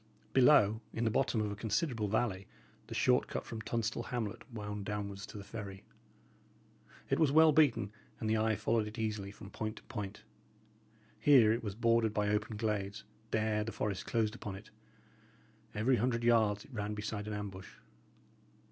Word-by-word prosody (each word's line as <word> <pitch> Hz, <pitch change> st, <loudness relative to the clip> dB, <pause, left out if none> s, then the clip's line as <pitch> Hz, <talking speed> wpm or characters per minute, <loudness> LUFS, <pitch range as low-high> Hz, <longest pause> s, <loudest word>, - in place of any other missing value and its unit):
Below, 120 Hz, -5 st, +5 dB
in 115 Hz, -, -1 dB
the 110 Hz, -, +2 dB
bottom 125 Hz, -2 st, +1 dB
of 105 Hz, -1 st, -1 dB
a -, -, -4 dB
considerable 110 Hz, +2 st, -1 dB
valley, 100 Hz, -3 st, -1 dB, 0.4 s
the -, -, -6 dB
short -, -, +3 dB
cut -, -, -4 dB
from 110 Hz, -, -6 dB
Tunstall 115 Hz, 0 st, -2 dB
hamlet 115 Hz, +1 st, -4 dB
wound 105 Hz, -2 st, -5 dB
downwards 100 Hz, -1 st, -4 dB
to -, -, -9 dB
the 100 Hz, -, -7 dB
ferry. 100 Hz, -2 st, -7 dB, 1.3 s
It -, -, +3 dB
was 155 Hz, -4 st, +4 dB
well 160 Hz, +1 st, +7 dB
beaten, 140 Hz, -9 st, +3 dB, 0.3 s
and 110 Hz, -, -2 dB
the 110 Hz, -, +2 dB
eye 110 Hz, 0 st, +2 dB
followed 105 Hz, +1 st, +1 dB
it 105 Hz, +3 st, -8 dB
easily 105 Hz, -3 st, -2 dB
from 100 Hz, 0 st, -11 dB
point 110 Hz, -1 st, -4 dB
to -, -, -13 dB
point. 105 Hz, -5 st, -6 dB, 1.0 s
Here 125 Hz, -7 st, +6 dB
it 115 Hz, -, -3 dB
was 100 Hz, -3 st, -4 dB
bordered 115 Hz, -1 st, +2 dB
by 105 Hz, -1 st, +1 dB
open 105 Hz, +1 st, -1 dB
glades; 105 Hz, -1 st, -2 dB, 0.3 s
there 110 Hz, -1 st, +1 dB
the 115 Hz, -, -4 dB
forest 100 Hz, -4 st, -3 dB
closed 110 Hz, -2 st, +1 dB
upon 105 Hz, -4 st, -6 dB
it; 100 Hz, +3 st, -12 dB, 1.0 s
every 120 Hz, +5 st, +3 dB
hundred 120 Hz, 0 st, 0 dB
yards 110 Hz, -3 st, +3 dB
it 140 Hz, -, -17 dB
ran 105 Hz, -1 st, -3 dB
beside 105 Hz, 0 st, -4 dB
an 105 Hz, -, -3 dB
ambush. 100 Hz, -2 st, -6 dB
110 Hz, 175 wpm, -33 LUFS, 105-115 Hz, 1.3 s, well